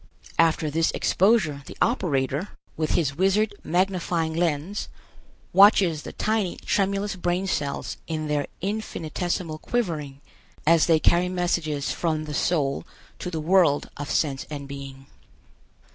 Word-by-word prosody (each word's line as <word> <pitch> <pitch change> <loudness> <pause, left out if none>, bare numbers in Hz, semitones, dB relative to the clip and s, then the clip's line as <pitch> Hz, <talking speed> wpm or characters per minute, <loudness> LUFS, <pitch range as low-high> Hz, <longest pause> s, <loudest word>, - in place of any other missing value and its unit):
After 160 -2 +3
this 165 +2 +2
exposure 190 -8 +2
the - - -10
operator, 145 - 0 0.2
with 155 -1 -1
his 145 -5 +1
wizard 200 +4 +2
magnifying 175 -2 0
lens, 170 +3 -1 0.6
watches 195 -6 +6
the - - -8
tiny 215 -4 -1
tremulous 200 0 0
brain 180 +1 -1
cells 145 -6 -2
in 155 -1 -3
their 145 -1 0
infinitesimal 175 -4 -3
quivering, 155 - -2 0.5
as 165 0 +5
they 165 -2 +5
carry 175 +3 +3
messages 170 -5 -1
from 155 -2 -1
the 150 - -6
soul 145 -3 0 0.4
to 180 - -4
the 165 -3 -3
world 165 -2 +3
of 145 - -6
sense 140 -4 0
and 145 -2 -6
being. 135 -1 -8
165 Hz, 130 wpm, -25 LUFS, 150-185 Hz, 0.6 s, watches